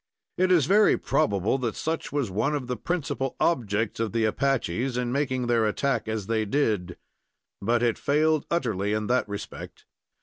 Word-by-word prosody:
It 185 Hz, 0 st, +2 dB
is 170 Hz, -7 st, +5 dB
very 205 Hz, +6 st, +5 dB
probable 105 Hz, -, +1 dB
that 120 Hz, -4 st, -2 dB
such 160 Hz, +1 st, -3 dB
was 140 Hz, -8 st, -1 dB
one 125 Hz, +10 st, 0 dB
of 140 Hz, -3 st, -3 dB
the 125 Hz, 0 st, -3 dB
principal 140 Hz, -5 st, -2 dB
objects 110 Hz, -9 st, 0 dB
of 115 Hz, -2 st, -1 dB
the 115 Hz, -1 st, +2 dB
Apaches 125 Hz, 0 st, 0 dB
in 125 Hz, -1 st, -1 dB
making 130 Hz, -2 st, 0 dB
their 115 Hz, -2 st, +2 dB
attack 135 Hz, +5 st, -1 dB
as 110 Hz, -2 st, -3 dB
they 110 Hz, +1 st, 0 dB
did; 105 Hz, -7 st, 0 dB, 0.6 s
but 120 Hz, +4 st, +1 dB
it 120 Hz, -2 st, +1 dB
failed 155 Hz, +1 st, +2 dB
utterly 105 Hz, -, 0 dB
in 110 Hz, 0 st, -1 dB
that 125 Hz, -1 st, +1 dB
respect. 100 Hz, 0 st, -8 dB
120 Hz, 170 wpm, -26 LUFS, 110-140 Hz, 0.6 s, is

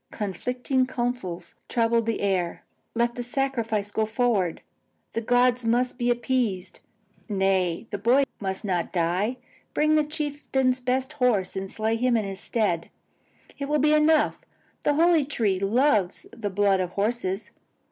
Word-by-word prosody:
Conflicting 250 Hz, +6 st, -1 dB
counsels 240 Hz, -9 st, -3 dB, 0.2 s
troubled 230 Hz, -1 st, +2 dB
the 225 Hz, -, -1 dB
air. 185 Hz, -4 st, -1 dB, 0.3 s
Let 235 Hz, +1 st, +1 dB
the 245 Hz, -, -5 dB
sacrifice 235 Hz, -5 st, -1 dB
go 220 Hz, 0 st, 0 dB
forward; 220 Hz, -7 st, 0 dB, 0.5 s
the 230 Hz, -, -1 dB
gods 245 Hz, +1 st, +3 dB
must 245 Hz, +2 st, +1 dB
be 240 Hz, 0 st, +1 dB
appeased. 240 Hz, -6 st, -1 dB, 0.5 s
Nay, 190 Hz, -2 st, +1 dB
the 205 Hz, -, -3 dB
boy 245 Hz, +7 st, +4 dB, 0.2 s
must 190 Hz, 0 st, -3 dB
not 180 Hz, -4 st, -1 dB
die; 185 Hz, +8 st, 0 dB, 0.4 s
bring 305 Hz, +1 st, +3 dB
the 305 Hz, -1 st, +4 dB
chieftain's 290 Hz, -4 st, -1 dB
best 255 Hz, +2 st, -1 dB
horse 245 Hz, -11 st, +1 dB
and 190 Hz, 0 st, -4 dB
slay 220 Hz, +1 st, -1 dB
it 230 Hz, +2 st, -2 dB
in 250 Hz, -1 st, +3 dB
his 195 Hz, -4 st, -2 dB
stead; 200 Hz, -8 st, -1 dB, 0.7 s
it 280 Hz, 0 st, -3 dB
will 300 Hz, -, +3 dB
be 300 Hz, +1 st, +3 dB
enough; 305 Hz, 0 st, +3 dB, 0.4 s
the 295 Hz, -, +2 dB
holy 330 Hz, 0 st, +4 dB
tree 220 Hz, -9 st, 0 dB
loves 205 Hz, -2 st, +2 dB
the 210 Hz, -3 st, -4 dB
blood 195 Hz, 0 st, +2 dB
of 180 Hz, -1 st, -2 dB
horses. 205 Hz, -1 st, -2 dB
230 Hz, 145 wpm, -25 LUFS, 195-255 Hz, 0.7 s, boy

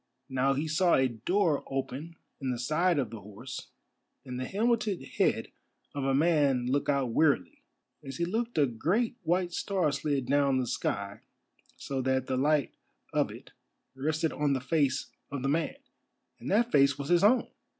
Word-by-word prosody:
Now 135 Hz, +1 st, +2 dB
he 150 Hz, +3 st, -1 dB
saw 170 Hz, +3 st, +3 dB
a 130 Hz, -, +3 dB
door 150 Hz, -, 0 dB
open 135 Hz, +4 st, -4 dB, 0.2 s
in 135 Hz, -2 st, -3 dB
the 125 Hz, -, -1 dB
side 155 Hz, +7 st, +1 dB
of 125 Hz, -6 st, -1 dB
the 115 Hz, -, -7 dB
horse, 105 Hz, +7 st, -8 dB, 0.6 s
and 125 Hz, -1 st, -5 dB
the 130 Hz, -, -3 dB
helmeted 220 Hz, -2 st, +1 dB
head 135 Hz, -, 0 dB, 0.4 s
of 140 Hz, -2 st, -3 dB
a 135 Hz, 0 st, +2 dB
man 145 Hz, -5 st, +3 dB
look 140 Hz, +4 st, 0 dB
out 135 Hz, -4 st, +1 dB
wearily. 115 Hz, -, +1 dB, 0.4 s
As 135 Hz, -1 st, -7 dB
he 170 Hz, -, 0 dB
looked 230 Hz, +5 st, -2 dB
a 150 Hz, -, +5 dB
great 175 Hz, -, 0 dB
white 175 Hz, +1 st, 0 dB
star 185 Hz, -7 st, 0 dB
slid 140 Hz, -2 st, -1 dB
down 140 Hz, -1 st, +2 dB
the 130 Hz, -, 0 dB
sky 100 Hz, -2 st, -3 dB, 0.6 s
so 135 Hz, -1 st, -3 dB
that 130 Hz, 0 st, 0 dB
the 130 Hz, -, -1 dB
light 145 Hz, +1 st, +2 dB, 0.4 s
of -, -, +2 dB
it -, -, -11 dB, 0.4 s
rested 155 Hz, +4 st, -1 dB
on 145 Hz, -1 st, +1 dB
the 135 Hz, -, 0 dB
face 140 Hz, 0 st, 0 dB, 0.2 s
of 140 Hz, -2 st, -4 dB
the 135 Hz, -, +1 dB
man, 160 Hz, +2 st, 0 dB, 0.6 s
and 125 Hz, -, -6 dB
that 235 Hz, +4 st, +2 dB
face 140 Hz, 0 st, +4 dB
was 140 Hz, 0 st, -5 dB
his 175 Hz, +1 st, +4 dB
own! 240 Hz, +5 st, +4 dB
140 Hz, 175 wpm, -29 LUFS, 130-170 Hz, 0.6 s, a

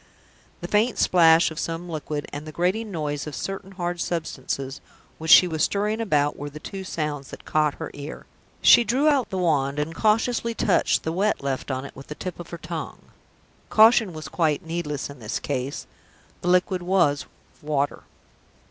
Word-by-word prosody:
The 175 Hz, -, -4 dB
faint 215 Hz, +6 st, +2 dB
splash 165 Hz, -2 st, +5 dB
of 160 Hz, -, -6 dB
some 165 Hz, +1 st, -4 dB
liquid, 150 Hz, -3 st, -4 dB
and 145 Hz, +2 st, -6 dB
the -, -, -6 dB
grating 185 Hz, +7 st, 0 dB
noise 150 Hz, -5 st, -3 dB
of 150 Hz, -, -6 dB
certain 195 Hz, +5 st, -5 dB
hard 175 Hz, -2 st, -3 dB
substances 140 Hz, -4 st, -3 dB, 0.4 s
which 160 Hz, 0 st, -5 dB
she 180 Hz, -, +9 dB
was 160 Hz, -2 st, -3 dB
stirring 210 Hz, +2 st, 0 dB
about, 145 Hz, -9 st, +1 dB
were 145 Hz, +1 st, -6 dB
the 150 Hz, +1 st, -10 dB
two 195 Hz, +4 st, -7 dB
sounds 150 Hz, -6 st, -3 dB
that -, -, -11 dB
caught 150 Hz, -2 st, +1 dB
her -, -, -6 dB
ear. 145 Hz, +2 st, -8 dB, 0.4 s
She 240 Hz, -, +8 dB
drew 260 Hz, +6 st, +1 dB
out 275 Hz, -5 st, +2 dB
the 190 Hz, -, -3 dB
wand, 145 Hz, -6 st, +1 dB
and 150 Hz, +2 st, -2 dB
cautiously 230 Hz, +4 st, +1 dB
touched 200 Hz, -5 st, +2 dB
the 160 Hz, -, -2 dB
wet 200 Hz, -2 st, 0 dB
left 135 Hz, 0 st, -3 dB
on 130 Hz, 0 st, -3 dB
it -, -, -10 dB
with 135 Hz, -, -11 dB
the 150 Hz, -, -7 dB
tip 180 Hz, +1 st, -6 dB
of 175 Hz, -, -8 dB
her 170 Hz, -, -6 dB
tongue. 165 Hz, 0 st, -7 dB, 0.6 s
Caution 220 Hz, -2 st, +6 dB
was 155 Hz, -2 st, -7 dB
quite 160 Hz, 0 st, 0 dB
needless 160 Hz, -4 st, -3 dB
in 140 Hz, -2 st, -11 dB
this 110 Hz, 0 st, -3 dB
case. 135 Hz, 0 st, -3 dB, 0.6 s
The -, -, -4 dB
liquid 180 Hz, +1 st, +2 dB
was 175 Hz, -6 st, +2 dB, 0.3 s
water. 145 Hz, -1 st, -1 dB
165 Hz, 185 wpm, -24 LUFS, 145-190 Hz, 0.6 s, she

